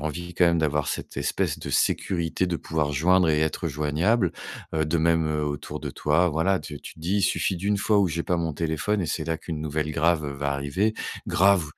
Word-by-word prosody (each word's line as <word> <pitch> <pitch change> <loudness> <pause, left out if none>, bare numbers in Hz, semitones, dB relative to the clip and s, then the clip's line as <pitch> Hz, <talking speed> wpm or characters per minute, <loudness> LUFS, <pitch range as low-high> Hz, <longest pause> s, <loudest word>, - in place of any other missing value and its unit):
envie 85 +4 -4
quand 90 - +3
même 85 0 +3
d'avoir 75 -2 +1
cette - - -4
espèce - - -1
de - - -6
sécurité, 85 0 0
de 85 -2 -1
pouvoir 75 -3 -2
joindre 90 +5 +3
et 75 -1 +3
être 80 +2 -1
joignable. 80 - +1 0.4
Heu, 80 - +2
de 80 +2 0
même, 80 0 +2
heu, 75 -1 -1
autour 75 -1 -4
de - - -4
toi, 75 +4 +2
voilà, 85 +4 +1
tu 75 -1 -8
tu - - -10
te - - -17
dis: 90 +5 0
«Il 100 - +1
suffit 95 0 +1
d'une 100 +4 0
fois 105 +1 +2
où 100 - +4
j'ai 85 0 -2
pas 90 - 0
mon 85 -2 -1
téléphone 85 +6 -1
et 85 - -2
c'est 80 - -2
là 80 0 -1
qu'une 80 -1 -6
nouvelle 75 0 -2
grave 80 +1 +2
va 70 0 0
arriver». 70 +11 0 0.3
Grave, 95 -2 +4
80 Hz, 225 wpm, -25 LUFS, 75-90 Hz, 0.4 s, où